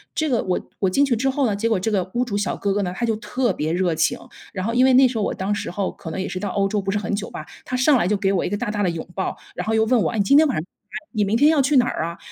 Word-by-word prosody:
这 315 - 0
个 245 -4 +1
我 185 -1 -2
我 190 - +2
进 275 +10 +3
去 260 -4 +1
之 265 +4 0
后 270 +1 0
呢， 210 -4 0
结 215 +3 -1
果 220 -4 +1
这 220 +4 -1
个 190 -3 0
屋 245 - +2
主 205 -4 -3
小 205 - -1
哥 200 -1 -1
哥 205 - 0
呢， 180 -1 -3
他 240 - -1
就 225 -2 0
特 240 0 -1
别 155 -1 -2
热 180 -1 +1
情， 160 +1 +1 0.4
然 185 0 -3
后 230 - -1
因 250 +2 +4
为 265 - +4
那 260 +1 +7
时 245 -2 -4
候 215 - 0
我 - - -1
当 195 +2 -2
时 - - -3
候 195 +1 -2
可 165 - -9
能 175 - -4
也 - - -3
是 185 - -4
到 200 0 -3
欧 195 +1 +1
洲 205 +1 -1
不 195 - -4
是 205 - 0
很 210 - -3
久 205 +1 -5
吧， - - -8 0.2
他 255 - -3
上 265 +2 +4
来 200 - +1
就 210 - +2
给 195 0 +1
我 185 - +1
一 - - -2
个 205 - -2
大 230 -1 -3
大 205 -1 -2
的 185 - +2
拥 165 -1 -5
抱， 190 - -2 0.2
然 - - -5
后 220 - +1
又 220 - +3
问 240 0 +3
我： - - 0
“诶 - - -3
你 205 - +3
今 275 - +4
天 315 - +6
晚 270 - -1
上 155 - -2 0.5
你 215 -3 +1
明 210 +4 +1
天 295 +4 +5
要 310 -3 +3
去 275 +1 +2
哪 245 - +5
儿 160 - -2
啊？” 170 +1 -6
210 Hz, 390 characters per minute, -22 LUFS, 190-245 Hz, 0.5 s, 那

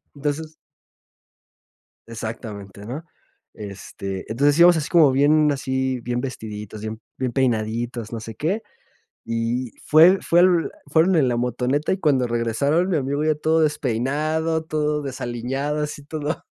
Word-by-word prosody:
entonces 150 +2 -3 1.5
Exactamente, 110 -3 -7
¿no? 140 +8 -6 0.5
Este, 100 -1 -7
entonces 145 +5 +3
íbamos 175 0 +7
así, 150 - -2
como 160 -6 +6
bien 150 +2 +4
así, 130 -2 -1
bien 120 +1 -2
vestiditos, 105 -5 -6
bien 110 0 -6 0.2
bien 125 -2 -2
peinaditos, 115 -2 -1
no 115 - -3
sé 110 -1 -8
qué. 185 - -1 0.6
Y 115 +2 -2
fue 170 +5 +7
fue 175 +1 +4
l 180 -2 +3 0.2
fueron 165 +5 +3
en 135 -5 +3
la 120 - 0
motoneta, 125 +6 0
y - - -2
cuando 135 -7 +2
regresaron, 120 - +1
mi 170 - +2
amigo 140 +2 -1
ya 155 -1 +2
todo 160 +2 +2
despeinado, 155 +3 0
todo 150 -1 -1
desaliñado, 135 +3 -3
así, 150 -1 -5
todo 150 +1 -4
135 Hz, 140 wpm, -22 LUFS, 115-155 Hz, 1.5 s, íbamos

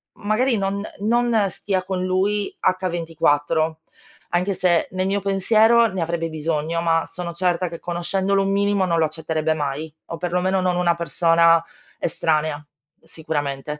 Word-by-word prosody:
magari 225 +4 +1
non 200 0 -1 0.2
non 225 -1 +2
stia 190 0 -2
con 185 -1 -2
lui 195 +3 0 0.4
H24, 160 -1 0 0.5
anche 180 +3 +1
se 175 -2 +2
nel 185 0 -1
mio 200 +1 0
pensiero 220 +4 +4
ne 190 -4 -4
avrebbe 165 0 -1
bisogno, 160 +1 -2
ma 165 -1 +2
sono 175 -1 -6
certa 180 0 0
che, 170 - -8
conoscendolo 190 +3 0
un 195 - 0
minimo, 200 0 +2
non 170 -2 +1
lo 160 - +4
accetterebbe 160 0 -1
mai 150 +1 -4
o, 165 - -6
perlomeno, 180 +2 0
non 180 -1 +1
una 175 -1 +2
persona 165 0 +3 0.4
estranea, 155 -2 0 0.4
sicuramente. 150 -2 -4
175 Hz, 145 wpm, -22 LUFS, 160-195 Hz, 0.5 s, pensiero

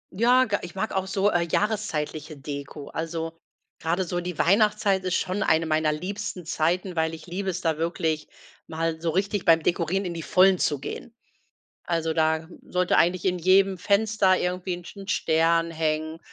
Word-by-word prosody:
Ja, 250 +4 +4
ga 205 -1 -1
ich 175 +1 -9
mag 220 +3 -2
auch 190 0 -1
so, 195 +2 +1
äh, 175 - +2
jahreszeitliche 160 -8 -2
Deko. 140 0 -7
Also, 165 0 -4 0.5
grade 170 +4 0
so 175 0 -3
die 180 -2 -5
Weihnachtszeit 205 +1 +3
ist 185 - 0
schon 190 +3 -1
eine 160 -2 +2
meiner 155 -1 +1
liebsten 185 +1 -5
Zeiten, 175 +3 -1
weil 160 0 0
ich 160 - -12
liebe 190 +2 -3
es, 180 +1 -3
da 160 -3 0
wirklich 160 -2 -1 0.4
mal 160 0 -2
so 170 - 0
richtig 195 +3 0
beim 165 -2 +4
Dekorieren 175 +3 0
in 175 - -3
die 165 - -5
Vollen 185 +5 +4
zu 145 - +1
gehen. 230 +10 -7 0.7
Also, 165 -2 -1
da 160 0 +1
sollte 180 0 0
eigentlich 175 +2 +2
in 180 -1 +1
jedem 190 +1 +4
Fenster 200 -2 +3
irgendwie 180 0 -2
'n 175 - -11
St - - -11
'n 195 - -9
Stern 165 +1 +2
hängen 155 0 -2
175 Hz, 180 wpm, -25 LUFS, 160-190 Hz, 0.7 s, Ja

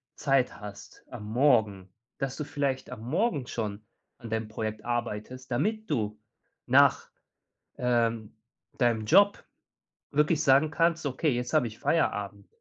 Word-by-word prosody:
Zeit 135 -7 +1
hast 105 -1 -11
am 105 - -8
Morgen, 105 -5 +2 0.3
dass 135 -2 -3
du 150 - -3
vielleicht 140 -3 -2
am - - -8
Morgen 145 - -1
schon 105 -2 -4 0.4
an 115 - -9
deinem 110 -1 -2
Projekt 110 0 -5
arbeitest, 120 +2 -4
damit 215 - -1
du 105 -6 -1 0.5
nach, - - +4 0.7
ähm, 115 -3 0 0.4
deinem 115 -4 +2
Job 200 - +4 0.7
wirklich 150 +2 +2
sagen 140 +3 +4
kannst: 165 0 +1
„Okay, 140 +2 0
jetzt 125 0 -2
habe 150 -6 +3
ich 110 - -10
Feierabend.“ 100 - -1
120 Hz, 135 wpm, -28 LUFS, 110-145 Hz, 0.7 s, nach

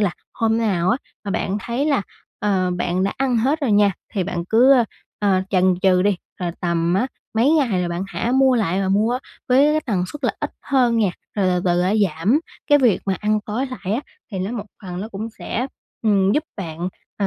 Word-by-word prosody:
là 200 -3 +2 0.2
hôm 225 0 +1
nào 190 -6 +1
á 235 - +3 0.3
mà 200 - -3
bạn 195 +1 -1
thấy 240 +7 -2
là, 280 -8 +2 0.4
ờ, 190 -3 +1
bạn 180 +1 0
đã 195 - 0
ăn 265 -2 +1
hết 270 +8 +1
rồi 265 -7 +1
nha, 205 -1 +4 0.2
thì 190 -3 0
bạn 170 -1 -3
cứ, 245 +5 +6
ơ, 250 -3 +5 0.3
ờ, 195 -3 +2
chần 185 -1 +3
chừ 185 -2 +4
đi, 200 -1 +2 0.2
rồi 175 -1 -1
tầm 170 0 +1
á 225 +7 +2 0.3
mấy 235 +6 +4
ngày 245 - +2
là 175 - -1
bạn 170 +1 -3
hả 230 +4 -2
mua 265 -1 +5
lại 195 -5 +1
và 190 - 0
mua 215 +6 +2 0.3
với 260 +2 +5
cái 310 - +2
tần 195 -7 0
suất 290 -2 -7
là - - +2
ít - - -2
hơn 250 -4 +2
nha, 210 -4 +3 0.3
rồi 200 -2 +2
từ 180 -1 +1
từ 175 -1 +2 0.3
giảm 185 - +1 0.3
cái 290 - +6
việc 245 -8 +3
mà 195 - +1
ăn 215 0 +1
tối 235 +6 -1
lại 250 -7 -5
á, 240 - 0 0.3
thì 190 - -3
nó 190 +5 -2
một 225 -4 -4 0.2
phần 180 -2 -5
nó 210 - -5
cũng 220 +1 -5
sẽ, 250 +3 -2 0.4
ừm, 200 -3 +3
giúp 300 +5 +1
bạn 170 -2 -4 0.3
ờ 200 - +3
205 Hz, 225 wpm, -21 LUFS, 185-245 Hz, 0.4 s, cứ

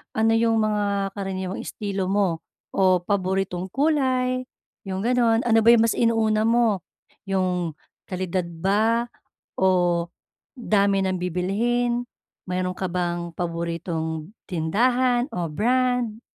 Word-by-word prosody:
ano 225 +1 +3
'yong 225 0 +3
mga 205 -2 0
karaniwang 190 -1 -4
estilo 195 -3 -3
mo, 195 -5 +1 0.3
o 185 -1 +4
paboritong 190 -1 -1
kulay, 260 - +1 0.5
'yong 190 +1 -3
gano'n? 240 -1 +3
Ano 225 -1 +4
ba 225 - 0
'yong 235 -1 +7
mas 230 - +2
inuuna 220 -1 +2
mo? 230 -5 +2 0.5
'Yong 180 -4 0 0.3
kalidad 185 -1 -2
ba 210 +7 +1 0.5
o 175 -2 +2 0.5
dami 200 -4 +2
ng 185 0 0
bibilhin? 230 +8 0 0.4
Mayro'n 180 0 -2
ka 185 -2 -3
bang 175 -1 -2
paboritong 165 -1 -3 0.2
tindahan 240 - +1
o 170 -2 -2
brand? 245 +4 0
195 Hz, 115 wpm, -24 LUFS, 180-230 Hz, 0.5 s, yong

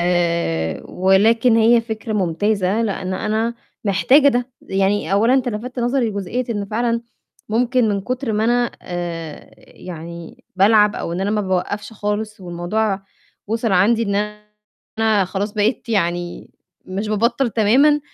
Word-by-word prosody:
آآ 170 - 0
ولكن 220 +6 +3
هي 230 +1 +5
فكرة 220 0 -5
ممتازة، 200 +2 0
لإن 190 -3 -2
أنا 220 +4 -1 0.3
محتاجة 255 +9 +4
ده، 245 -1 0
يعني 195 +1 0
أولًا 225 +6 +4
أنت 255 -2 +1
لفتت 245 +3 -5
نظري 245 -1 +1
لجزئية 205 +5 -3
إن 205 -3 -2
فعلًا 230 +3 -1 0.5
ممكن 240 +1 +2
من 200 -1 0
كتر 255 +3 -3
ما 215 +1 +1
أنا 240 +1 +2
آآ 170 -3 -6
يعني 170 -1 -10
بالعب 210 +1 +5
أو 170 - -4
إن 180 - -3
أنا 200 - 0
ما 210 0 +1
باوقّفش 200 +2 -2
خالص، 210 0 -3
والموضوع 190 +3 -2 0.4
وصل 225 0 -1
عندي 215 +5 +3
إن 200 -3 -1 0.8
أنا 220 -3 +3
خلاص 195 +3 -3
بقيت 215 +3 0
يعني 175 -4 -2 0.3
مش 195 +3 -4
بابطّل 235 +4 +1
تمامًا، 260 +8 +4
210 Hz, 140 wpm, -20 LUFS, 190-230 Hz, 0.8 s, هي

